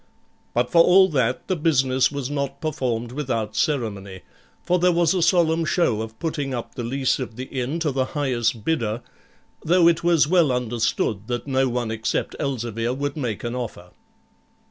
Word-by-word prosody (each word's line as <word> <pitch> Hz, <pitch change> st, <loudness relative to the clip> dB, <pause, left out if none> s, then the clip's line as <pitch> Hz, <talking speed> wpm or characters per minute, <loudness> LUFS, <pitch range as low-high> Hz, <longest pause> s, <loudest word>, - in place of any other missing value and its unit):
But 120 Hz, +1 st, +1 dB
for 165 Hz, -1 st, +7 dB
all 190 Hz, +2 st, +6 dB
that, 130 Hz, -5 st, 0 dB
the 185 Hz, -, 0 dB
business 135 Hz, -6 st, +2 dB
was 140 Hz, -1 st, -4 dB
not 140 Hz, -1 st, -3 dB
performed 125 Hz, -7 st, -2 dB
without 115 Hz, -6 st, -3 dB
ceremony, 105 Hz, -, -2 dB, 0.4 s
for 180 Hz, 0 st, +1 dB
there 180 Hz, +1 st, +4 dB
was 170 Hz, -1 st, +2 dB
a 185 Hz, -, 0 dB
solemn 170 Hz, -1 st, +3 dB
show 155 Hz, -, +1 dB
of 110 Hz, 0 st, -7 dB
putting 145 Hz, -4 st, -3 dB
up 120 Hz, -, -6 dB
the 120 Hz, -, -5 dB
lease 130 Hz, +3 st, 0 dB
of 120 Hz, -4 st, -5 dB
the 125 Hz, -, -5 dB
inn 130 Hz, +3 st, -3 dB
to 155 Hz, -3 st, +1 dB
the 130 Hz, -1 st, 0 dB
highest 120 Hz, -6 st, 0 dB
bidder, 115 Hz, -7 st, -1 dB, 0.6 s
though 175 Hz, +1 st, +4 dB
it 170 Hz, -1 st, +3 dB
was 170 Hz, -3 st, +4 dB
well 170 Hz, -4 st, +3 dB
understood 115 Hz, -3 st, -1 dB
that 120 Hz, -1 st, -3 dB
no 135 Hz, -1 st, +1 dB
one 120 Hz, -2 st, -2 dB
except 110 Hz, 0 st, -2 dB
Elzevir 120 Hz, -3 st, -2 dB
would 145 Hz, +1 st, -3 dB
make 120 Hz, -9 st, -3 dB
an 120 Hz, 0 st, -3 dB
offer. 115 Hz, -8 st, -6 dB
130 Hz, 175 wpm, -23 LUFS, 115-155 Hz, 0.6 s, for